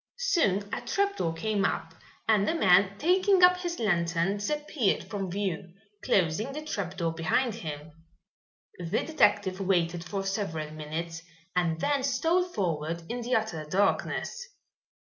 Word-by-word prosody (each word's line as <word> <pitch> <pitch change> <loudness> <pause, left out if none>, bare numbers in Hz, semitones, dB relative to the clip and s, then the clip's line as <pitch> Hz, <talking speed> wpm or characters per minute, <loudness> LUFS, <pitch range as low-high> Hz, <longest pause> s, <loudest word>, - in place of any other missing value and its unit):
Soon 330 - +1
a - - -2
trapdoor 400 - 0
came 205 +4 -1
up, - - -1 0.3
and 210 -2 +3
the 330 - +1
man, 195 - +4
taking 370 - +3
up 360 0 +7
his 350 -1 -4
lantern, 175 -2 +1
disappeared 290 +1 0
from 195 -3 -4
view, 185 -2 -3 0.3
closing 195 +8 +1
the 305 +2 -5
trapdoor 180 - -2
behind 170 +10 +1
him. 155 -6 -7 0.9
The 170 -2 -1
detective 205 -11 +2
waited 175 -3 +1
for 195 +2 -3
several 165 -6 -3
minutes 160 +2 -5 0.3
and 165 -3 +1
then 285 - +1
stole 305 +7 +2
forward 170 - -2
in 240 +1 -3
the 245 +2 0
utter 215 -8 -1
darkness. 205 - 0
195 Hz, 135 wpm, -28 LUFS, 170-270 Hz, 0.9 s, up